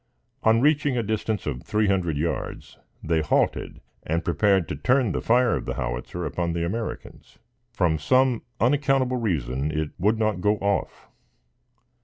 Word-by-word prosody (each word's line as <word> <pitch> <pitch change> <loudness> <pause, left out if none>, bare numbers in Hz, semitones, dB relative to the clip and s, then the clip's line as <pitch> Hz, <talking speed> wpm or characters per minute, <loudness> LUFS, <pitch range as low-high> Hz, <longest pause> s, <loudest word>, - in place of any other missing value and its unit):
On 115 +1 +4
reaching 145 -2 +2
a 120 - 0
distance 110 -1 -2
of 65 -5 -3
three 105 0 0
hundred 90 -6 0
yards, 80 +3 -4 0.2
they 80 0 +1
halted 75 - 0 0.2
and 85 +2 -2
prepared 95 0 +2
to - - -2
turn 125 - +2
the - - -2
fire 125 +1 +3
of - - -4
the - - -3
howitzer 65 +8 -4
upon 85 -1 -2
the 85 0 -1
Americans. 110 +6 -6 0.3
From 80 -4 +1
some 130 - +2 0.2
unaccountable 135 0 +2
reason, 75 - -1
it 75 -1 -2
would 105 +5 +2
not 110 -4 0
go 105 +3 +3
off. 100 0 -2
100 Hz, 155 wpm, -25 LUFS, 80-120 Hz, 0.3 s, On